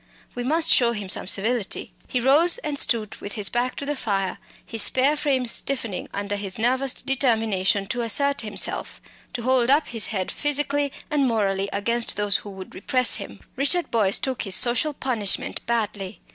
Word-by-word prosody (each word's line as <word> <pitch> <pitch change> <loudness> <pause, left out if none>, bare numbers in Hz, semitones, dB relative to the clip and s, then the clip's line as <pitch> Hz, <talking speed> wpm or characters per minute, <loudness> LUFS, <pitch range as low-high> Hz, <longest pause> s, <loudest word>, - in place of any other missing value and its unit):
We 245 - -4
must 320 +6 +3
show 235 -3 +3
him 205 -4 -6
some - - +2
civility." 215 +2 -1
He 250 - -1
rose 295 - +5
and 285 -2 0
stood 220 -4 +1
with 205 - -8
his 205 -2 0
back 245 +1 -1
to 280 - -4
the 290 +1 -2
fire, 195 -7 -2 0.3
his 225 -2 +1
spare 270 +7 +4
frame 275 -4 0
stiffening 235 -4 -1
under 205 0 -3
his 195 -2 -4
nervous 255 +3 +1
determination 225 -7 0
to 245 -2 -2
assert 280 +5 +1
himself 210 -3 -3 0.3
to 240 - -4
hold 255 -1 +2
up 290 +3 +3
his 225 -3 0
head 190 -4 -3
physically 290 -1 0 0.2
and 285 -3 +2
morally 200 -4 0
against 235 +4 -1
those 205 -1 +1
who 205 - -10
would 190 -1 -10
repress 255 +6 +2
him. - - -9
Richard 330 +6 0
Boyce 205 -4 +2
took 260 -2 -3
his 195 -3 -1
social 250 +5 +2
punishment 230 -8 -1
badly. 210 -5 -2
235 Hz, 175 wpm, -23 LUFS, 205-270 Hz, 0.3 s, rose